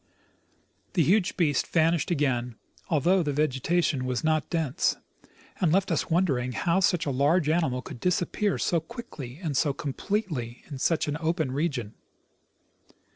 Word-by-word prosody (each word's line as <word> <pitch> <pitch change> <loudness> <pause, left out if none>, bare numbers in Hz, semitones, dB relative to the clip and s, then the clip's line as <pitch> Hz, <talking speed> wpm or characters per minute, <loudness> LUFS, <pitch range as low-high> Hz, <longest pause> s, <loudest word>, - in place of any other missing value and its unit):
The 170 - +3
huge 185 +4 +2
beast 155 -6 +2
vanished 165 +1 +2
again, 130 -7 0 0.3
al 155 -5 +2
though 185 +5 +4
the 150 -3 -1
vegetation 150 0 +1
was 125 -1 -2
not 155 -1 +1
dense, 160 -3 0 0.6
and 175 -5 +2
left 190 +3 +2
us - - 0
wondering 140 -8 +1
how 170 +8 +1
such 180 -3 +2
a 145 - 0
large 145 +5 +2
animal 135 -6 +1
could - - -9
disappear 180 - 0
so 170 - +1
quickly 160 - -9
and 155 -4 -2
so 145 0 +2
completely 145 - -3
in 140 -4 -8
such 165 +3 +1
an 150 +1 -1
open 165 -4 0
region. 135 -7 -2
155 Hz, 150 wpm, -27 LUFS, 135-175 Hz, 0.6 s, though